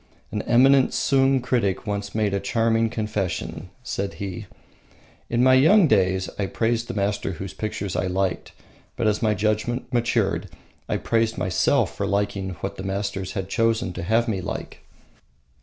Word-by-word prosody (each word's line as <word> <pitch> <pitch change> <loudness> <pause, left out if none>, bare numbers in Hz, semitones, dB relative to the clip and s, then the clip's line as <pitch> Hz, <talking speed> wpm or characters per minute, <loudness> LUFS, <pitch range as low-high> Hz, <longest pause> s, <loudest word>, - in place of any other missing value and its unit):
An - - -2
eminent 130 +3 +4
Sung 135 -1 +3
critic 120 -5 0
once 100 -1 -4
made 105 -2 +1
a 100 - +1
charming 115 +3 +1
confession. 100 -6 -3
Said 100 -5 -3
he: 100 +1 -6 0.8
"In 120 +1 +2
my 130 0 +6
young 165 +10 +6
days 95 -4 +2
I 100 - 0
praised 115 +5 -1
the 120 - -5
master 100 -1 -1
whose 90 +1 -7
pictures 100 +1 -4
I 95 - 0
liked, 95 0 -1 0.4
but - - -2
as 105 -1 +1
my 110 -2 +2
judgement 110 +5 -1
matured 120 -1 0 0.4
I - - +1
praised 115 0 0
myself 95 - +1
for - - -2
liking 100 -1 -1
what - - -4
the 95 - -6
masters 95 -1 -3
had 95 -2 -3
chosen 115 -1 0
to 85 - -5
have 115 +7 +1
me 100 -5 -1
like." - - -6
105 Hz, 160 wpm, -24 LUFS, 95-115 Hz, 0.8 s, my